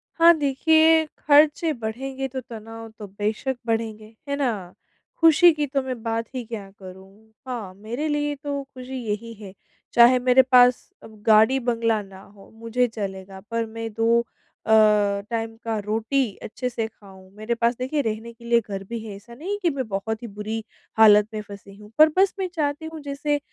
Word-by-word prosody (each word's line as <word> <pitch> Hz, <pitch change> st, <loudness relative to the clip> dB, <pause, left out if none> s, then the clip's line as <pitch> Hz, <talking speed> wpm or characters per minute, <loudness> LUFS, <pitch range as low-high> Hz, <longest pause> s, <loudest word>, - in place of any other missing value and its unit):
हाँ 335 Hz, 0 st, +7 dB
देखिए, 315 Hz, +3 st, +4 dB
खर्चे 300 Hz, +2 st, +4 dB
बढ़ेंगे 265 Hz, +3 st, -5 dB
तो 260 Hz, 0 st, -5 dB
तनाव 225 Hz, -2 st, -10 dB
तो 210 Hz, -, -7 dB
बेशक 210 Hz, +6 st, -3 dB
बढ़ेंगे, 220 Hz, -1 st, -3 dB, 0.2 s
है 280 Hz, -, 0 dB
ना? 220 Hz, -11 st, -2 dB, 0.5 s
खुशी 330 Hz, +1 st, +7 dB
की 300 Hz, -1 st, -1 dB
तो 275 Hz, 0 st, -1 dB
मैं 255 Hz, -3 st, -5 dB
बात 230 Hz, 0 st, -2 dB
ही 250 Hz, -, -3 dB
क्या 215 Hz, -4 st, -7 dB
करूँ। 195 Hz, +3 st, -14 dB, 0.2 s
हाँ, 225 Hz, -7 st, -5 dB
मेरे 230 Hz, +9 st, -4 dB
लिए 295 Hz, -1 st, -1 dB
तो 285 Hz, -1 st, -3 dB
खुशी 260 Hz, -1 st, -9 dB
यही 220 Hz, +2 st, -4 dB
है 190 Hz, -2 st, -10 dB, 0.4 s
चाहे 240 Hz, +2 st, +7 dB
मेरे 250 Hz, +1 st, +5 dB
पास 250 Hz, 0 st, +5 dB
अ, -, -, -10 dB
गाड़ी-बंगला 225 Hz, +1 st, +2 dB
ना 190 Hz, -1 st, -14 dB
हो 195 Hz, -, -16 dB
मुझे 230 Hz, +2 st, -1 dB
चलेगा 195 Hz, -3 st, -7 dB
पर 230 Hz, 0 st, -1 dB
मैं 225 Hz, 0 st, -6 dB
दो 230 Hz, +2 st, +3 dB
अ, 225 Hz, -1 st, -10 dB, 0.6 s
टाइम 225 Hz, -1 st, -3 dB
का 225 Hz, -1 st, -2 dB
रोटी 220 Hz, +2 st, -1 dB
अच्छे 250 Hz, +3 st, -4 dB
से 230 Hz, -2 st, -3 dB
खाऊँ। 190 Hz, -4 st, -17 dB
मेरे 215 Hz, +3 st, -3 dB
पास 235 Hz, +1 st, +1 dB
देखिए 265 Hz, +4 st, -1 dB
रहने 225 Hz, -1 st, -4 dB
के 235 Hz, 0 st, -17 dB
लिए 235 Hz, 0 st, +4 dB
घर 195 Hz, -1 st, -4 dB
भी 235 Hz, 0 st, -4 dB
है 210 Hz, -2 st, -7 dB
ऐसा 205 Hz, +4 st, -14 dB
नहीं 315 Hz, +11 st, -6 dB
है 410 Hz, -, -1 dB
कि 350 Hz, -, +2 dB
मैं 260 Hz, -4 st, -3 dB
बहुत 220 Hz, +3 st, -4 dB
ही -, -, -5 dB
बुरी 215 Hz, +2 st, -5 dB, 0.3 s
हालत 210 Hz, -1 st, +7 dB
में 215 Hz, -, -3 dB
फँसी 200 Hz, -1 st, -12 dB
हूँ, 210 Hz, +1 st, -15 dB
पर 310 Hz, 0 st, +8 dB
बस 385 Hz, 0 st, +4 dB
मैं 380 Hz, -, -1 dB
चाहती 295 Hz, -1 st, -2 dB
हूँ 320 Hz, -, -7 dB
जैसे 290 Hz, +1 st, -2 dB
230 Hz, 185 wpm, -23 LUFS, 215-270 Hz, 0.6 s, पर